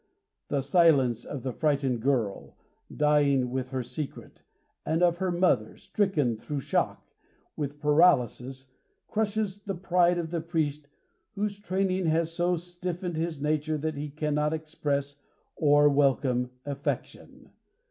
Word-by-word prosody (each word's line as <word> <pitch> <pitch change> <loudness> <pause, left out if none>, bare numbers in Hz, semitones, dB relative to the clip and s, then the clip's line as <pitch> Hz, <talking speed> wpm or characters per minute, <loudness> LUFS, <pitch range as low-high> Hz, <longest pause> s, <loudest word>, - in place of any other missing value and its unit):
The 140 - 0
silence 135 - +3
of 140 -4 -6
the 130 -2 -3
frightened 140 -5 0
girl, 120 -6 -1 0.3
dying 145 -4 +2
with 130 0 -3
her 130 -1 -2
secret, 150 +4 -7 0.4
and 160 +3 0
of 175 -1 +3
her 190 0 -1
mother, 175 +1 +1
stricken, 150 - 0
through 145 +5 -4
shock, - - -1 0.5
with 145 -1 -4
paralysis, 135 -4 +2 0.4
crushes 210 -2 -1
the 195 -1 -4
pride 175 0 +2
of 165 -2 -3
the 170 -2 -1
priest 155 -3 -2 0.5
whose 205 0 -2
training 190 -2 0
has 160 +1 +1
so 175 +1 +1
stiffened 175 0 -5
his 160 -3 -3
nature 155 +1 0
that 155 +1 -3
he 145 +1 -4
cannot 150 +1 -1
express 145 -3 -3 0.3
or 145 -1 +5
welcome 135 -3 +2 0.2
affection. 140 -1 -5
150 Hz, 130 wpm, -28 LUFS, 140-175 Hz, 0.5 s, or